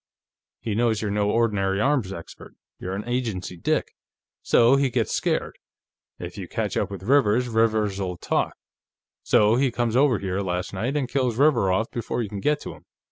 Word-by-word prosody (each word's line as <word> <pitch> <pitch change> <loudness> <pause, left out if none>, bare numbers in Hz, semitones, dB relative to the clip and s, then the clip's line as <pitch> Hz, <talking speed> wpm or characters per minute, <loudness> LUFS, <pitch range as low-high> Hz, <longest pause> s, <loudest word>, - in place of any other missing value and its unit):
He 110 - -3
knows 115 0 +1
you're 105 - -1
no 105 0 +1
ordinary 105 -4 +1
arms 130 -5 +1
expert; 85 -4 -10 0.2
you're 95 +1 -4
an 105 +4 -6
agency 115 -8 -3
dick. 85 - -1 0.5
So 120 +3 +4
he 140 -1 +2
gets - - -1
scared. - - -1 0.6
If - - -8
you - - -6
catch - - -3
up - - 0
with 100 -2 -8
Rivers, 125 -1 +3
Rivers'll 105 -5 0
talk. - - -1 0.7
So 105 +2 +3
he 135 0 +2
comes 120 -1 -1
over 130 -3 +4
here, 95 -1 -3
last 90 -1 -3
night, 120 +9 -2
and 135 -3 -1
kills 125 -3 -1
Rivers 135 -8 +3
off 110 +5 0
before 120 0 -3
you 105 - -6
can 100 -1 -5
get 150 +8 +1
to - - -7
him. - - -17
110 Hz, 185 wpm, -24 LUFS, 100-125 Hz, 0.7 s, So